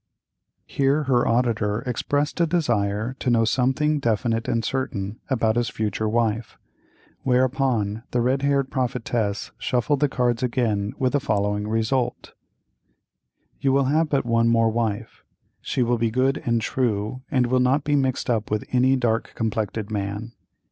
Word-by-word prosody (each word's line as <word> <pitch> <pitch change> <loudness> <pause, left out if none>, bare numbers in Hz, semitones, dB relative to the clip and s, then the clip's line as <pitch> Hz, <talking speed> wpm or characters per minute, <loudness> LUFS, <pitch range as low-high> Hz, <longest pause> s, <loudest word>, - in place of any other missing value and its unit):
Here 140 +2 +1
her 125 -3 +2
auditor 115 -3 +1
expressed 145 +5 -1
a 170 - +3
desire 120 - 0
to 130 - -1
know 115 -1 +3
something 135 +6 +1
definite 115 -1 0
and 115 -2 0
certain 110 -6 -3
about 115 -4 +1
his 120 -1 +1
future 110 0 -2
wife, 115 0 -1 0.6
whereupon 125 -4 +1
the 120 - 0
red 130 +3 +1
haired 140 -1 +1
prophetess 120 -5 -2
shuffled 130 +3 0
the 145 0 +2
cards 125 -2 0
again 115 -5 0
with 130 0 0
the 145 - +3
following 105 -5 -1
result: 115 +3 -1 1.3
"You 135 -1 +2
will 135 0 +3
have 160 0 +2
but 140 -4 +1
one 115 0 +2
more 115 -1 +3
wife. 110 -1 -3 0.4
She 125 - 0
will 120 0 +1
be 115 0 +1
good 130 +4 +1
and 115 -1 +2
true, 110 0 -1
and 130 -4 +2
will 130 +1 +2
not 130 +3 +2
be 145 0 +1
mixed 130 -2 0
up 110 -3 0
with 105 0 -1
any 130 +1 +4
dark 120 -3 -1
complected 110 -1 -2
man. 105 +2 -3
120 Hz, 155 wpm, -23 LUFS, 110-130 Hz, 1.3 s, any